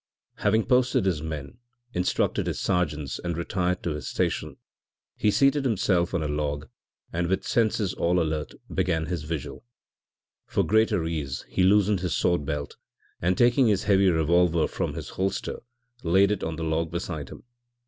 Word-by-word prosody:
Having 110 Hz, +2 st, +2 dB
posted 125 Hz, -4 st, +3 dB
his 90 Hz, -6 st, 0 dB
men, 80 Hz, -, -6 dB, 0.3 s
instructed 90 Hz, +1 st, 0 dB
his -, -, -2 dB
sergeants 75 Hz, -7 st, -1 dB
and 85 Hz, -2 st, -2 dB
retired 90 Hz, +1 st, -1 dB
to 85 Hz, -, -1 dB
his 75 Hz, -4 st, -5 dB
station, -, -, -2 dB, 0.6 s
he 105 Hz, -, +2 dB
seated 140 Hz, +5 st, +3 dB
himself 95 Hz, -7 st, +1 dB
on 85 Hz, -, 0 dB
a -, -, -1 dB
log, 75 Hz, -1 st, -2 dB, 0.5 s
and 85 Hz, +1 st, 0 dB
with 95 Hz, +2 st, -1 dB
senses 110 Hz, -4 st, +1 dB
all 90 Hz, +1 st, +1 dB
alert 80 Hz, -2 st, -2 dB, 0.2 s
began 80 Hz, -1 st, 0 dB
his 85 Hz, -1 st, -3 dB
vigil. 75 Hz, -1 st, -5 dB, 0.8 s
For -, -, +1 dB
greater 110 Hz, -5 st, +2 dB
ease 75 Hz, -5 st, -3 dB
he -, -, 0 dB
loosened 100 Hz, +1 st, +4 dB
his 90 Hz, -2 st, -1 dB
sword 85 Hz, -5 st, +1 dB
belt 75 Hz, 0 st, -4 dB, 0.4 s
and 90 Hz, +1 st, +1 dB
taking 120 Hz, +1 st, +4 dB
his 105 Hz, -1 st, +2 dB
heavy 100 Hz, -2 st, +4 dB
revolver 85 Hz, 0 st, +3 dB
from -, -, -3 dB
his -, -, -6 dB
holster 95 Hz, 0 st, -2 dB, 0.4 s
laid 95 Hz, +4 st, +4 dB
it 105 Hz, -, -2 dB
on 80 Hz, -, -2 dB
the 80 Hz, -, -5 dB
log 80 Hz, +1 st, 0 dB
beside 80 Hz, -4 st, -4 dB
him. -, -, -11 dB
90 Hz, 165 wpm, -26 LUFS, 80-100 Hz, 0.8 s, loosened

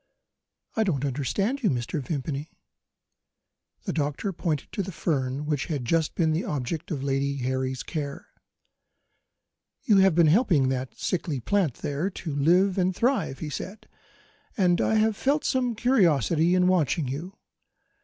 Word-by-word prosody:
"I 220 Hz, -, +3 dB
don't 145 Hz, -9 st, 0 dB
understand 195 Hz, -, -1 dB
you, 215 Hz, -, +2 dB
Mr. 125 Hz, +3 st, -2 dB
Vimpany." 140 Hz, +2 st, -4 dB, 1.3 s
The -, -, -3 dB
doctor 150 Hz, +6 st, -2 dB
pointed 160 Hz, -4 st, -2 dB
to -, -, -2 dB
the 190 Hz, 0 st, -5 dB
fern 140 Hz, -4 st, -2 dB
which 150 Hz, -3 st, -1 dB
had 145 Hz, -7 st, -3 dB
just 160 Hz, +4 st, +1 dB
been 160 Hz, -3 st, +2 dB
the 160 Hz, +3 st, 0 dB
object 145 Hz, +2 st, -3 dB
of 145 Hz, -6 st, -3 dB
Lady 140 Hz, 0 st, 0 dB
Harry's 130 Hz, 0 st, -2 dB
care. 145 Hz, -3 st, -5 dB, 1.6 s
"You 210 Hz, -4 st, +4 dB
have 190 Hz, -3 st, +5 dB
been 170 Hz, -1 st, +5 dB
helping 155 Hz, -, +3 dB
that 130 Hz, -1 st, -3 dB
sickly 165 Hz, -6 st, -2 dB
plant 165 Hz, -, 0 dB
there 145 Hz, +7 st, -2 dB
to 165 Hz, -6 st, -6 dB
live 180 Hz, +7 st, +3 dB
and 185 Hz, 0 st, +1 dB
thrive," 240 Hz, -, 0 dB
he 150 Hz, -2 st, -6 dB
said, 195 Hz, +8 st, -7 dB, 0.7 s
"and 180 Hz, -3 st, +3 dB
I 220 Hz, -, +2 dB
have 220 Hz, 0 st, +3 dB
felt 280 Hz, +6 st, 0 dB
some 250 Hz, -3 st, 0 dB
curiosity 175 Hz, -, +3 dB
in 180 Hz, 0 st, +3 dB
watching 170 Hz, -4 st, +2 dB
you. 160 Hz, +9 st, -6 dB
160 Hz, 150 wpm, -26 LUFS, 140-190 Hz, 1.6 s, have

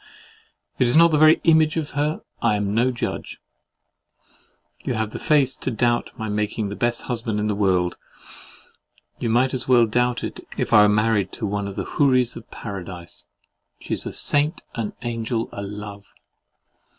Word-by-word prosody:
If -, -, -11 dB
it 125 Hz, -, +5 dB
is 120 Hz, -, +1 dB
not 170 Hz, 0 st, +7 dB
the 155 Hz, -, +3 dB
very 155 Hz, +1 st, +6 dB
image 160 Hz, -1 st, +4 dB
of 155 Hz, -2 st, -3 dB
her, 150 Hz, +2 st, -1 dB, 0.2 s
I 105 Hz, -, +2 dB
am 105 Hz, -1 st, -1 dB
no 120 Hz, +4 st, +3 dB
judge.—You 120 Hz, -1 st, -9 dB
have 110 Hz, -1 st, -2 dB
the -, -, -6 dB
face 140 Hz, -4 st, +2 dB
to -, -, -3 dB
doubt 120 Hz, 0 st, 0 dB
my 110 Hz, -, -4 dB
making 105 Hz, 0 st, -2 dB
the 100 Hz, -, -5 dB
best 120 Hz, +1 st, -1 dB
husband 115 Hz, -3 st, -2 dB
in 105 Hz, -, -1 dB
the 105 Hz, -, 0 dB
world; 95 Hz, -3 st, +1 dB, 1.2 s
you 115 Hz, -, -1 dB
might 125 Hz, +3 st, +2 dB
as 130 Hz, -2 st, -3 dB
well 125 Hz, -2 st, +5 dB
doubt 125 Hz, +2 st, 0 dB
it -, -, -5 dB, 0.2 s
if -, -, -1 dB
I 105 Hz, -1 st, +8 dB
was 105 Hz, -, +3 dB
married 105 Hz, -3 st, +1 dB
to 115 Hz, -, -4 dB
one 100 Hz, 0 st, -2 dB
of 100 Hz, -, -7 dB
the -, -, -3 dB
Houris 130 Hz, -4 st, +2 dB
of 115 Hz, 0 st, -11 dB
Paradise. 95 Hz, -4 st, -8 dB, 0.5 s
She -, -, -5 dB
is -, -, -1 dB
a -, -, -4 dB
saint, 150 Hz, +4 st, +1 dB
an 115 Hz, -4 st, -4 dB
angel, 115 Hz, -1 st, -2 dB
a -, -, -6 dB
love. 100 Hz, 0 st, -8 dB
115 Hz, 180 wpm, -23 LUFS, 105-130 Hz, 1.2 s, I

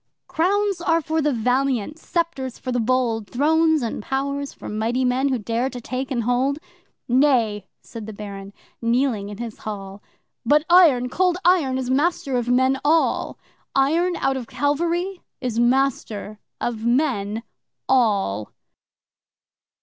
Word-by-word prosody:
'Crowns 395 Hz, +2 st, 0 dB
are 330 Hz, -1 st, +2 dB
for 320 Hz, 0 st, -1 dB
the 300 Hz, 0 st, +2 dB
valiant 255 Hz, +3 st, 0 dB
sceptres 325 Hz, -9 st, -2 dB
for 255 Hz, -, -5 dB
the 245 Hz, -, 0 dB
bold! 230 Hz, -2 st, 0 dB
Thrones 315 Hz, +2 st, +2 dB
and 230 Hz, -, -3 dB
powers 280 Hz, +3 st, -2 dB
for -, -, -11 dB
mighty 230 Hz, +4 st, -1 dB
men 255 Hz, +3 st, +1 dB
who 260 Hz, -, +1 dB
dare 230 Hz, +4 st, -1 dB
to 250 Hz, -, -7 dB
take 255 Hz, +2 st, -4 dB
and 245 Hz, -4 st, -1 dB
hold.' 250 Hz, +4 st, +1 dB, 0.5 s
'Nay!' 245 Hz, -5 st, +2 dB, 0.2 s
said 225 Hz, -3 st, -9 dB
the -, -, -5 dB
Baron, 200 Hz, -1 st, -8 dB, 0.3 s
kneeling 230 Hz, -3 st, 0 dB
in 205 Hz, -, -8 dB
his 230 Hz, -2 st, -7 dB
hall, 200 Hz, -2 st, -7 dB, 0.4 s
'But 300 Hz, +1 st, +3 dB
Iron 305 Hz, -9 st, +6 dB
Cold 360 Hz, +6 st, +1 dB
Iron 320 Hz, -8 st, +3 dB
is 255 Hz, -1 st, -2 dB
master 290 Hz, 0 st, +1 dB
of 245 Hz, -1 st, -1 dB
men 260 Hz, +2 st, +3 dB
all! 315 Hz, +2 st, +1 dB, 0.4 s
Iron, 330 Hz, +7 st, +2 dB
out 270 Hz, -3 st, 0 dB
of 245 Hz, -3 st, -6 dB
Calvary, 345 Hz, +6 st, -1 dB, 0.2 s
is 240 Hz, -3 st, -2 dB
master 240 Hz, -4 st, 0 dB, 0.2 s
of 225 Hz, -2 st, -3 dB
men 235 Hz, -4 st, 0 dB, 0.4 s
all! 200 Hz, -, +1 dB
260 Hz, 140 wpm, -22 LUFS, 230-295 Hz, 0.5 s, Iron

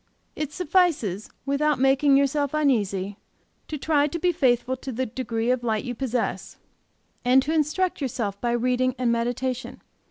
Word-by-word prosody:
It 300 Hz, -2 st, -3 dB
suffices, 300 Hz, -, +1 dB, 0.2 s
without 285 Hz, +1 st, +1 dB
making 270 Hz, +2 st, +4 dB
yourself 280 Hz, +1 st, +1 dB
uneasy, 205 Hz, -9 st, 0 dB, 0.5 s
to 305 Hz, -, -4 dB
try 295 Hz, 0 st, +2 dB
to 300 Hz, -, -4 dB
be 355 Hz, +2 st, +2 dB
faithful 260 Hz, -5 st, +1 dB
to 265 Hz, -, -6 dB
the 260 Hz, +2 st, -2 dB
degree 235 Hz, -1 st, -2 dB
of 250 Hz, -1 st, 0 dB
light 220 Hz, -3 st, 0 dB
you 250 Hz, -, -3 dB
possess, 245 Hz, -1 st, -3 dB, 0.7 s
and 250 Hz, +2 st, +5 dB
to 310 Hz, -, -1 dB
instruct 320 Hz, +3 st, 0 dB
yourself 225 Hz, -7 st, -3 dB
by 240 Hz, -1 st, 0 dB
reading 250 Hz, +1 st, +1 dB
and 245 Hz, -2 st, +1 dB
meditation. 245 Hz, +2 st, -2 dB
260 Hz, 155 wpm, -25 LUFS, 240-295 Hz, 0.7 s, and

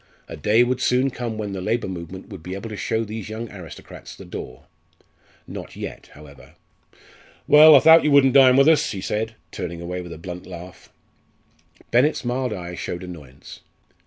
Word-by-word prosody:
A -, -, -8 dB
day 105 Hz, +10 st, +3 dB
would 125 Hz, +1 st, -1 dB
soon 130 Hz, +2 st, +2 dB
come 120 Hz, -3 st, -5 dB
when 105 Hz, -2 st, -4 dB
the 95 Hz, -1 st, -5 dB
labour 115 Hz, +4 st, -1 dB
movement 90 Hz, 0 st, -8 dB
would 100 Hz, -6 st, -10 dB
be 90 Hz, +3 st, -6 dB
able 100 Hz, +3 st, -7 dB
to -, -, -5 dB
show 110 Hz, +2 st, -2 dB
these 110 Hz, -1 st, -7 dB
young 110 Hz, +1 st, -6 dB
aristocrats 90 Hz, -5 st, -11 dB
the -, -, -12 dB
door. 65 Hz, 0 st, -9 dB, 0.8 s
Not -, -, -9 dB
yet, -, -, -8 dB
however. 70 Hz, -1 st, -16 dB, 0.9 s
"Well, 155 Hz, +1 st, +9 dB
I 135 Hz, -, +7 dB
thowt 160 Hz, +1 st, +7 dB
you 150 Hz, -, +2 dB
wouldn't 140 Hz, -3 st, +5 dB
dine 130 Hz, -2 st, +6 dB
with 140 Hz, +1 st, +5 dB
us," 160 Hz, -1 st, +4 dB
he 100 Hz, -, -5 dB
said, 110 Hz, +3 st, -3 dB, 0.2 s
turning 85 Hz, -1 st, -6 dB
away 90 Hz, +1 st, -5 dB
with 90 Hz, -1 st, -10 dB
a 85 Hz, -, -8 dB
blunt 90 Hz, +2 st, -9 dB
laugh. 90 Hz, 0 st, -11 dB, 1.0 s
Bennett's 125 Hz, +3 st, +2 dB
mild 125 Hz, 0 st, -1 dB
eye 90 Hz, -3 st, -6 dB
showed 85 Hz, 0 st, -6 dB
annoyance. 75 Hz, -7 st, -11 dB
105 Hz, 185 wpm, -22 LUFS, 90-125 Hz, 1.0 s, Well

